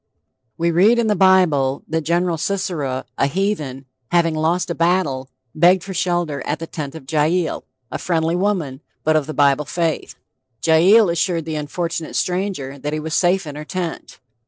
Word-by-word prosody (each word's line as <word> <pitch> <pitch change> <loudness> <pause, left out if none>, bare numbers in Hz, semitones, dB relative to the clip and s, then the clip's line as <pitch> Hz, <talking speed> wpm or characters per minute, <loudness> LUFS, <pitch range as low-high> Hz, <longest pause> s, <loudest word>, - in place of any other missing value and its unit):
We 170 +1 +1
read 200 +8 +4
in 235 - +2
the 210 -1 +2
Bible 170 -9 +3
that 160 0 -1
Gen. 170 +1 +1
Sisera, 155 -9 -2
a 140 - +3
heathen, 150 -6 -2 0.2
having 170 -2 +2
lost 165 +3 0
a - - 0
battle, 165 -7 0 0.2
begged 175 +3 +4
for 195 - -6
shelter 175 -6 -1
at 150 - -1
the 165 - -6
tent 150 -3 -6
of 160 - -10
Jael, 160 +3 0 0.3
a - - -4
friendly 165 -1 0
woman, 175 -8 -1 0.2
but 155 0 +2
of 155 -3 +1
the 155 - -5
Bible 145 0 +3
faith. 165 +2 -2 0.5
Jael 185 +7 +6
assured 170 -1 0
the 160 - -4
unfortunate 165 +2 -4
stranger 180 -7 -2
that 150 +2 -4
he 155 - -1
was 155 0 -5
safe 180 +1 +2
in 145 -2 -7
her 150 - -6
tent. 175 0 -5
165 Hz, 175 wpm, -20 LUFS, 150-180 Hz, 0.5 s, Jael